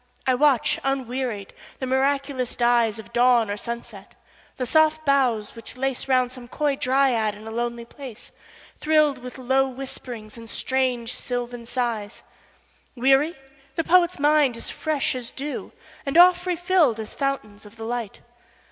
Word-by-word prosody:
I 260 - +3
watch, 270 -1 +3
unwearied, 255 -6 -2 0.2
the 260 - -3
miraculous 265 -1 0
dyesOf 235 -2 +1
dawn 240 -3 +4
or - - -1
sunset; 235 +2 -7 0.4
the 255 - -1
soft 315 +3 +3
boughs 250 -7 +2
which 230 +2 -9
laceRound 255 -1 0
some 250 -2 -10
coy 290 +2 0
dryad 255 -5 +2
in 210 +1 -12
a 220 - -6
lonely 235 0 -3
place, 250 -2 -10 0.5
Thrilled 305 -3 +3
with 250 +1 -9
low 265 +1 +2
whispering 250 -4 -7
and 230 -1 -11
strange 250 -3 -1
sylvan 245 -2 -4
sighs:Weary? 250 +5 -2 0.4
The 330 - 0
poet's 350 +1 +4
mind 290 -4 +3
is - - -4
fresh 310 -3 -1
as 250 -2 -5
dew, 285 +2 -5 0.3
And 275 +3 -1
oft 360 +1 +6
refilled 350 - +2
as 220 - -6
fountains 215 -7 -3
of 210 - -16
the 225 -1 -7
light. 235 -3 -4
255 Hz, 140 wpm, -24 LUFS, 235-275 Hz, 0.5 s, oft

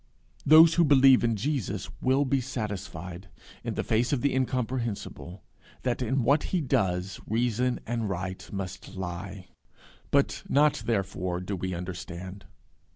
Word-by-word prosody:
Those 160 +2 +8
who 170 - +4
believe 135 -4 +6
in 115 -1 +2
Jesus 105 -6 -2
will 135 +2 +3
be 135 0 +1
satisfied, 95 - -6 0.3
in - - -3
the - - -1
face 115 +2 +1
of 140 -4 +1
the 140 - +1
incomprehensible, 120 - -3 0.4
that 125 0 -1
in 130 +1 0
what 140 +6 +3
he 185 - 0
does 95 - 0
reason 120 +2 0
and 115 -2 -2
right 95 0 -5
must 95 -1 -6
lie; 95 +1 -6 0.6
but - - +2
not 150 +1 +3
therefore 95 -5 -1
do 90 +2 -4
we 95 0 -3
understand. 90 +2 -7
110 Hz, 140 wpm, -28 LUFS, 95-130 Hz, 0.6 s, Those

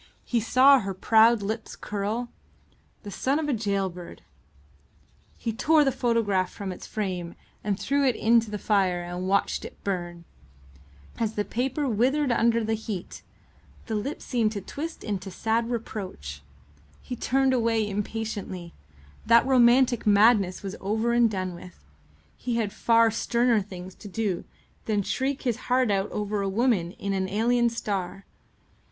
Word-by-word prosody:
He 240 - +1
saw 260 +5 +6
her 195 -4 -4
proud 225 +2 +4
lips 220 +2 -4
curl. 215 +4 -3 0.7
The 205 - -7
son 270 +7 0
of 315 -1 -2
a 290 - +1
gaol 200 -4 0
bird! 175 - -10 1.1
He 225 - -3
tore 305 +6 +4
the 270 - +2
photograph 225 -7 +1
from 200 -2 -6
its 180 - -9
frame 180 -5 -4 0.3
and 200 -1 -1
threw 280 0 +1
it 250 - +2
into 230 0 +3
the 210 - -3
fire 190 -4 +1
and 175 +1 -5
watched 200 +1 +1
it - - -9
burn. 175 -3 -4 0.9
As 225 -2 -1
the 205 - -1
paper 265 +5 -2
writhed 260 +4 +1
under 230 0 +2
the 220 +1 -1
heat, 215 -4 -5 0.6
the 225 - -4
lips 220 +8 -3
seemed 225 -4 0
to 205 - -3
twist 320 - -6
into 195 -2 -4
sad 225 +4 -1
reproach. 190 - -5 0.6
He 250 - -5
turned 265 +2 +1
away 225 -3 +1
impatiently. 205 -4 -4 0.5
That 235 +1 +6
romantic 250 -2 +4
madness 205 -3 +4
was 195 0 -5
over 220 +4 0
and 235 -1 +4
done 185 -3 -3
with. 175 - -13 0.5
He 240 -1 -3
had 220 -4 -1
far 230 -1 +4
sterner 235 0 +2
things 185 -1 -9
to 210 - -8
do 205 -2 -2 0.4
than 210 -2 0
shriek 265 +6 -2
his 240 -3 0
heart 250 -3 +3
out 195 +1 0
over 210 0 -2
a 195 - -1
woman 195 -5 +1
in 200 -1 -4
an 190 -1 -1
alien 235 +4 +2
star. 195 -4 -4
220 Hz, 155 wpm, -26 LUFS, 195-240 Hz, 1.1 s, saw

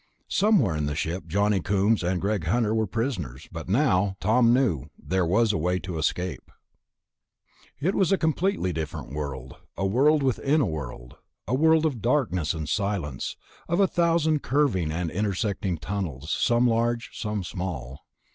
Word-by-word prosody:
Somewhere 195 - +3
in 75 -1 -1
the 75 - -2
ship 85 +2 -3
Johnny 100 +3 +1
Coombs 100 +3 +2
and 90 +1 0
Greg 100 -3 -1
Hunter 110 +4 +1
were 110 -1 +1
prisoners... 90 - -3
but 80 0 -7
now, 100 -5 +2
Tom 115 +2 +4
knew, 120 - +1
there 95 -2 -1
was 110 +4 +3
a - - -1
way 90 +3 +1
to 90 -3 -5
escape. 90 +3 -2 1.3
It 170 +8 +1
was 190 -4 +2
a 195 - +4
completely 160 - 0
different 75 -4 -5
world, 65 -3 -5 0.2
a 95 - -1
world 140 +9 +3
within 135 +3 +2
a 140 - +3
world, 65 - -6 0.3
a 120 - -1
world 160 +3 +4
of 135 -8 -1
darkness 105 - +1
and 80 -2 -4
silence, 95 -10 -2 0.3
of 170 +3 +1
a 200 - +6
thousand 165 -4 +2
curving 120 - +1
and 85 0 -2
intersecting 100 -2 -1
tunnels, 80 -4 -4
some 120 +7 +2
large, 115 0 +1
some 105 -3 -3
small. 80 -8 -5
100 Hz, 160 wpm, -26 LUFS, 80-125 Hz, 1.3 s, a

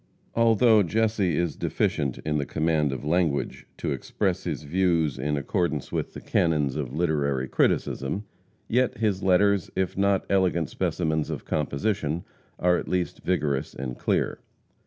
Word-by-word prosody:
Although 115 -1 +5
Jesse 105 -3 +1
is 85 -2 0
deficient 70 -3 -1
in 75 -1 0
the 70 - -1
command 80 -2 +1
of 65 +2 -5
language 80 -2 0
to - - -2
express - - -2
his - - -3
views 85 -2 +1
in 75 0 0
accordance 75 +1 -1
with - - -3
the - - -7
canons 75 -5 +1
of 70 -5 -3
literary 70 -4 0
criticism, 70 +9 0 0.4
yet 125 0 +1
his 105 -3 0
letters, 100 0 +3
if 95 -1 -1
not 100 0 +2
elegant 90 -5 +1
specimens 80 -3 -1
of - - -5
composition, 75 +2 -1 0.3
are 90 0 +3
at - - -7
least 90 -1 -2
vigorous 75 -5 -1
and 65 -2 -5
clear. - - 0
85 Hz, 145 wpm, -26 LUFS, 75-95 Hz, 0.4 s, Although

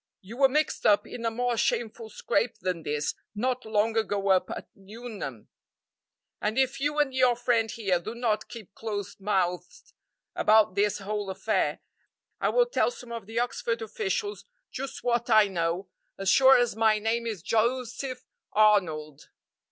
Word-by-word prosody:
You 215 +5 -10
were 270 -1 +5
mixed 300 +3 0
up 205 - +4
in 235 - -8
a - - +3
more 245 +1 -1
shameful 225 0 -1
scrape 230 +1 -1
than 180 -3 -3
this 150 -1 -2 0.2
not 255 +3 -1
long 220 +1 +1
ago 205 -3 0
up 185 -1 +3
at - - -6
Nuneham, 200 - -8 0.9
and 215 +3 -1
if 265 +1 +1
you 290 +2 -1
and 290 -3 +2
your 255 -2 +4
friend 235 -2 +1
here 195 -6 0
do 215 +7 -7
not 225 -3 -1
keep 220 -5 -10
close 205 -4 -5
mouthed 180 -3 -2 0.4
about 215 -3 +4
this 205 +1 +1
whole 205 0 -4
affair, 190 - -1 0.6
I - - +1
will - - +4
tell 485 - +1
some 250 - -11
of 230 -4 -6
the 225 +1 -7
Oxford 470 - -1
officials 435 -1 -3 0.3
just 270 +1 -6
what 240 0 0
I 215 -2 +6
know 175 0 -2 0.3
as 195 -1 -1
sure 265 +3 +7
as 245 -3 +1
my 220 -1 +3
name 225 +2 -1
is 210 -7 -4
Joseph 250 +3 -1 0.3
Arnold. 165 -9 +2
225 Hz, 160 wpm, -27 LUFS, 200-245 Hz, 0.9 s, sure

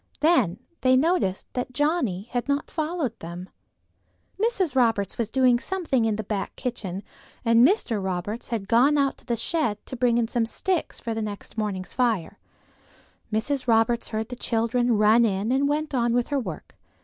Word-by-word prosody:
Then 300 - +3 0.2
they 255 0 +5
noticed 300 - +1
that 250 0 -3
Johnnie 290 - 0
had 245 +1 -2
not 280 0 -1
followed 310 -6 -2
them. 175 +2 -8 0.9
Mrs. 405 - +1
Roberts 225 -6 +1
was 225 -3 0
doing 250 -1 +3
something 315 -8 0
in 220 -2 +1
the 215 - -3
back 205 -1 -3
kitchen, 205 -7 -4 0.4
and 230 +1 +5
Mr. 245 - 0
Roberts 190 +5 -3
had 220 -5 -3
gone 260 +7 +4
out 275 -1 +1
to - - -22
the 240 - +1
shed 230 -3 -1
to - - -6
bring 245 -1 +2
in 235 -1 +1
some 230 -1 0
sticks 365 +8 -2
for 230 - -3
the 225 - -3
next 205 -2 -6
morning's 200 -4 -3
fire. 230 -9 0 0.9
Mrs. 250 +5 -1
Roberts 230 +1 +2
heard 220 0 -3
the 250 - -5
children 235 0 +1
run 215 +3 +5
in 205 +1 0
and 275 +2 +2
went 300 0 -1
on 240 -2 +1
with 245 0 +1
her 285 -1 +1
work. 185 -11 -7
235 Hz, 175 wpm, -25 LUFS, 215-275 Hz, 0.9 s, they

